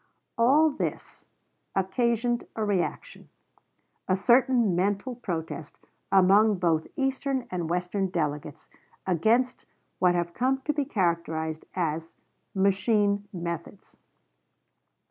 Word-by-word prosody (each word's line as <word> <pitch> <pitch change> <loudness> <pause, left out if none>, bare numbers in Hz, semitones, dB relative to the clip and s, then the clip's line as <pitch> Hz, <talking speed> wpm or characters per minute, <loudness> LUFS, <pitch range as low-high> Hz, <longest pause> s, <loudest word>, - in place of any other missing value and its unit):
All 285 +7 +4
this 285 - -5 0.5
occasioned 235 +5 0
a 220 - -1
reaction 205 - -3 0.8
a 185 - +3
certain 240 -1 +3
mental 200 +7 0
protest 165 -9 -5 0.3
among 200 +3 +5
both 165 -3 +1
Eastern 270 -1 -1
and 175 -3 -3
Western 180 +3 -1
delegates 150 -5 -3 0.4
against 225 +8 +1 0.3
what 180 -1 +4
have 170 0 -1
come 260 +5 +1
to 300 +3 -1
be 290 -2 -1
characterized 170 - -1
as 165 -2 -2 0.4
"machine" 200 +1 +2
methods. 170 +1 -6
195 Hz, 100 wpm, -27 LUFS, 170-240 Hz, 0.8 s, among